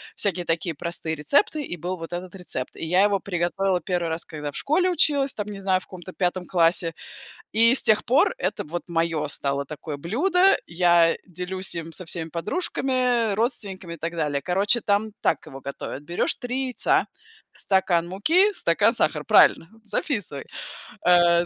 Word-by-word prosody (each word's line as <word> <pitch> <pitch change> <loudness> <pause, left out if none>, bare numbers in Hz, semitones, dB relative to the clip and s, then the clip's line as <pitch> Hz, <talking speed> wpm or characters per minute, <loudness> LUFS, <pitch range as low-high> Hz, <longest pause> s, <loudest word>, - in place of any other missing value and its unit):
всякие 185 -3 +1
такие 165 0 -1
простые 165 +1 -3
рецепты, 285 - +1
и 175 - -5
был 180 +3 -4
вот 165 +1 -8
этот 180 +2 -6
рецепт. 175 -8 -5
И - - -7
я 180 +4 +3
его 205 -1 +2
приготовила 185 +1 -1
1 175 -1 -2
раз, 160 +1 -3
когда 150 -2 -6
в - - -7
школе 360 +6 +1
училась, 285 -6 +3
там 210 -1 -5
не 205 -1 -7
знаю, 190 -1 +2
в - - -10
каком-то 185 0 -10
5 180 -1 -1
классе. 165 -1 +2 0.6
И 230 +3 +5
с - - +5
тех 215 - +3
пор 255 - +3
это - - -2
вот 175 +4 -6
мое 165 -2 0
стало 140 -1 -2
такое 150 0 -7
блюдо. 360 - +2
Я 170 -1 +3
делюсь 185 +1 -2
им 165 -1 -5
со 180 - -2
всеми 165 -1 -3
подружками, 245 - 0
родственниками 200 -6 -2
и - - -9
так 165 +2 -4
далее. 150 -4 -1
Короче, 200 +6 +3
там 210 +1 0
так - - 0
его 135 0 -10
готовят: 140 0 -7
берешь 170 +4 -1
3 255 +1 -3
яйца, 250 - +1 0.5
стакан 175 -3 +1
муки, 330 - +3
стакан - - +2
сахара. - - 0
Правильно, 165 - +5 0.2
записывай. 205 - -2 0.6
Э, 175 -1 +5
180 Hz, 170 wpm, -24 LUFS, 165-215 Hz, 0.6 s, И